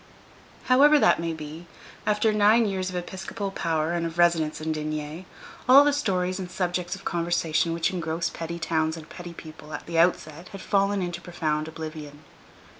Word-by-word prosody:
However 290 +4 +6
that - - +4
may 165 0 -2
be, 160 +2 -8 0.4
after 210 +1 +2
nine 215 +2 +5
years 190 -2 -2
of 185 - -7
episcopal 190 +3 -5
power 165 -3 -1
and 170 -1 -1
of 165 0 -8
residence 170 -3 +2
in 160 +1 -2
D——, 155 +2 -4 0.4
all 275 +3 +9
the 290 0 +2
stories 185 -9 -1
and 185 -2 -5
subjects 180 0 -2
of 195 - -14
conversation 170 -1 0
which 165 +1 0
engross 165 -1 -2
petty 170 +1 -5
towns 160 -1 -1
and 155 - -10
petty 175 -1 -9
people 155 -1 -11
at - - -8
the 165 -1 -1
outset 170 -1 +1
had 195 - -9
fallen 200 -1 +1
into 175 -1 -4
profound 155 -3 -2
oblivion. 155 -2 -8
170 Hz, 175 wpm, -26 LUFS, 160-190 Hz, 0.4 s, all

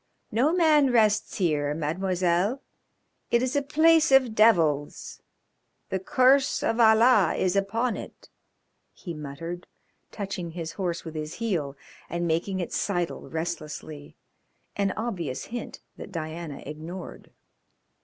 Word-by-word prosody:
"No 250 +8 +2
man 310 -5 +4
rests 215 -3 +2
here, 150 -5 0
Mademoiselle. 180 - 0 0.7
It 235 +1 +2
is 255 - -1
the 285 - +2
place 315 +2 +4
of 260 -4 +5
devils. 165 -10 +2 0.7
The 190 - -1
curse 260 +6 +3
of 225 - 0
Allah 220 -1 +5
is 185 0 0
upon 225 +5 0
it," - - -10 0.7
he 175 - -8
muttered, 160 +4 -7 0.4
touching 190 -5 -5
his 165 -2 -5
horse 175 -4 -3
with 160 - -7
his 155 0 -5
heel, 165 -12 -2 0.3
and 170 +1 -2
making 170 +4 -1
it 175 - -4
sidle 175 -4 -2
restlessly 155 -2 -6 0.6
an 200 -1 0
obvious 175 - -3
hint 240 +1 -7 0.2
that - - -9
Diana 160 -3 -6
ignored. 160 +5 -8
185 Hz, 125 wpm, -26 LUFS, 160-230 Hz, 0.7 s, of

